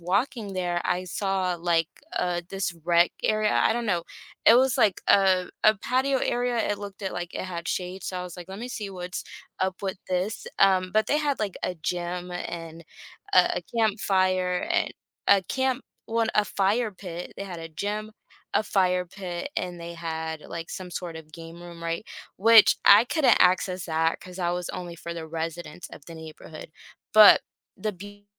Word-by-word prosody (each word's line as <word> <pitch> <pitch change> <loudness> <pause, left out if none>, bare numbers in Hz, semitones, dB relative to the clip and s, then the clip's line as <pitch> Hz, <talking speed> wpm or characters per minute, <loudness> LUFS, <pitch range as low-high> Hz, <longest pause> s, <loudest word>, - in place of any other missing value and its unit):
walking 200 +4 -1
there, 175 -2 -1
I 180 0 0
saw, 185 -1 -1
like, 165 -1 +1 0.3
uh, 175 -1 0
this 195 -2 -2
rec 175 0 +4
area. 215 0 +2
I - - +3
don't 235 0 -2
know. 175 -5 0 0.4
It 225 - +9
was, 260 +1 +4
like, 210 -5 +3
a 185 -2 +4
a 215 - +7
patio 260 +5 +1
area. 245 0 0
It 205 - -1
looked 200 0 -9
at, 190 - -2
like, 175 0 -5
it - - -3
had 175 -2 -5
shade. 185 +1 -3
So 185 - -3
I - - -4
was, 180 -1 -8
like, 175 -1 -9
let 195 +2 -7
me 245 - -5
see 215 -4 -5
what's 180 -2 -6 0.3
up 190 +1 -2
with 190 -1 -3
this. 185 +5 -2
Um, 185 -1 +4
but 215 0 +3
they 295 - +3
had, 290 -5 -1
like, 205 -3 -2
a 180 - -1
gym 175 +2 -3
and 170 -2 -6 0.5
a 180 -1 +4
campfire 185 -4 +2
and 355 - +1 0.3
a 200 -1 +6
camp 265 +4 -1 0.2
well, 230 0 +1
a 210 - +4
fire 210 +3 +1
pit. 180 -3 -8
They 200 - -5
had 180 -4 -7
a 165 - -7
gym, 205 +6 -4 0.4
a 215 - +2
fire 180 -3 +1
pit, 180 +5 -6
and 180 -1 -3
they 170 0 -7
had, 160 -1 -4
like, 165 +1 -7
some 185 -1 -6
sort 175 -1 -5
of 160 -1 -11
game 165 +1 -10
room, 170 -1 -10
right, 165 +6 -2 0.3
which 225 +2 +7
I 205 +4 +8
couldn't 305 +2 +3
access 185 0 +3
that 160 0 +1
'cause 180 -1 -11
I 175 - +1
was 175 0 -3
only 175 -1 -6
for 170 0 -6
the 165 -1 -6
residents 165 +1 -5
of 145 - -12
the 165 - -9
neighborhood. 155 0 -10 0.4
But 215 -1 +9 0.3
the 215 -1 -2
beu 205 +2 -12
185 Hz, 190 wpm, -26 LUFS, 175-205 Hz, 0.5 s, It